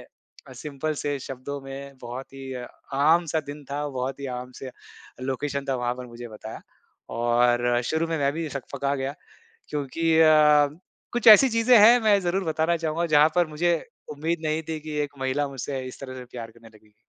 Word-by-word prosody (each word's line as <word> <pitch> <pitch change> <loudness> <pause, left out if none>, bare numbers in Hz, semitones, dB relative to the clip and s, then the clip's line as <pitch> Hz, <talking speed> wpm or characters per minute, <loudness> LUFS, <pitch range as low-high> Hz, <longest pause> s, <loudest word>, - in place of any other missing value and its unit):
अ, 135 - -18
simple 150 +3 -4
से 145 -1 -2
शब्दों 135 +2 -6
में 135 0 -9
बहुत 125 +3 -7
ही 135 0 -9 0.6
आम 165 +2 +4
सा 160 - +3
दिन 145 0 -9
था, 145 +1 -2
बहुत 135 0 -4
ही 140 - -4
आम 125 0 -10
से 130 - -6 0.6
लोकेशन 140 +1 -3
था, 135 - +1
वहाँ 120 - 0
पर 125 - -7
मुझे 120 0 -9
बताया 110 0 -9 0.5
और 120 +1 +2 0.2
शुरू 160 +4 0
में 165 - -1
मैं 140 0 +1
भी 160 0 -3
सकपका 140 0 -3
गया। 135 +1 -3 0.5
क्योंकि 145 +2 -4 0.2
अ, 150 -2 +6 0.4
कुछ 240 -1 -2
ऐसी 220 +5 +9
चीज़ें 230 +1 +4
हैं 230 +4 +8
मैं 210 -3 +4
ज़रूर 185 +2 -1
बताना 160 +1 +1
चाहूँगा 165 +1 -1
जहाँ 150 +1 +7
पर 175 -2 +3
मुझे, 165 +3 0 0.4
उम्मीद 160 +4 -2
नहीं 155 +1 0
थी 160 -1 -3
कि 150 0 -6
एक 145 -1 -6
महिला 135 +2 -1
मुझसे 135 0 -4
इस 130 - -10
तरह 130 -2 -7
से 125 - -8
प्यार 115 -2 -6
करने 115 0 -17
लगेगी। 110 -1 -22
145 Hz, 190 wpm, -25 LUFS, 130-160 Hz, 0.6 s, ऐसी